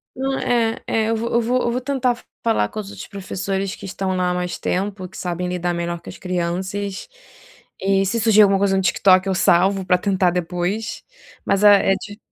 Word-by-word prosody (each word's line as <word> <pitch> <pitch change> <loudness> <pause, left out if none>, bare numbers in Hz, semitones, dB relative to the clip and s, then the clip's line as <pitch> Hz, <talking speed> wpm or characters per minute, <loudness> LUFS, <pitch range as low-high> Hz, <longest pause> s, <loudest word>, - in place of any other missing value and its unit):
Não 270 +1 -2
é 230 -2 +1
é, 220 -1 +1
eu 225 - +1
vou 230 +1 -2
eu 235 - +3
vou 250 +2 +1
eu 235 - 0
vou 250 +1 -2
tentar 255 -2 -1 0.2
falar 225 - +1
com - - -6
os 205 -2 -6
outros - - -9
professores 195 -1 -3
que - - -10
estão 190 0 -3
lá 180 -1 +1
há 180 - 0
mais 180 0 -3
tempo, 190 -1 -3
que - - -12
sabem 180 0 -3
lidar 175 -1 -1
melhor 170 0 -3
com - - -11
as - - -10
crianças, 185 - -3 0.7
e 195 0 +2
se 230 +5 0
surgir 215 -1 +5
alguma 195 -1 +4
coisa 195 -1 +2
no 190 - +2
TikTok, 185 0 +4
eu 190 - 0
salvo 190 +2 +3
para 180 -1 +3
tentar 185 -2 +1
depois, 180 +5 -3 0.4
mas 195 +1 +1
é 200 -1 +6
é - - 0
de 205 +2 -9
195 Hz, 215 wpm, -21 LUFS, 180-215 Hz, 0.7 s, é